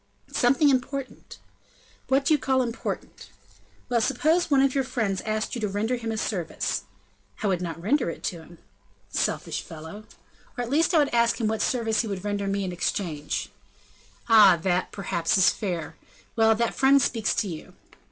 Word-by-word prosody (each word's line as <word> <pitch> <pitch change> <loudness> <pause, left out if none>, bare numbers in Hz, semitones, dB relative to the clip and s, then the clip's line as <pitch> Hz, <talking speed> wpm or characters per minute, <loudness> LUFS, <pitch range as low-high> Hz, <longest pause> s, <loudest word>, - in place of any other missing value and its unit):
"Something 275 +4 +3
important." 265 +1 -3 0.7
"What 270 +1 +2
do 310 - +4
you 300 - +3
call 260 -1 +1
important?" 225 - -6 0.6
"Well! 240 -2 +1
suppose 310 +9 +1
one 275 -2 +4
of 275 -1 +2
your 275 - +1
friends 225 -7 -2
asked 215 +1 -2
you 235 - -4
to 210 - 0
render 215 +5 -1
him 230 -2 -4
a 220 - -3
service?" 180 -6 -2 0.6
"I - - 0
would 185 -3 +1
not 165 -2 -5
render 240 - +1
it - - -8
to 175 - -2
him." 170 +1 -15 0.5
"Selfish - - -1
fellow!" 160 +7 -10 0.5
"Or 245 - -1
at 240 - -6
least 325 +4 +2
I - - +6
would 290 -4 +2
ask 235 0 +2
him 225 - 0
what 220 0 -1
service 225 -3 +1
he 230 - -5
would 195 -2 -5
render 205 -1 -2
me 195 0 -1
in 185 - -3
exchange." 170 -3 -3 0.8
"Ah! 210 -6 +7
that, 185 -1 0
perhaps, 180 -3 -1
is 190 - +5
fair. 175 -7 -4 0.4
Well, 225 -1 +4
that 235 +1 0
friend 275 +1 +5
speaks 225 -4 0
to 210 - 0
you." 160 -4 -8
220 Hz, 180 wpm, -25 LUFS, 190-255 Hz, 0.8 s, Ah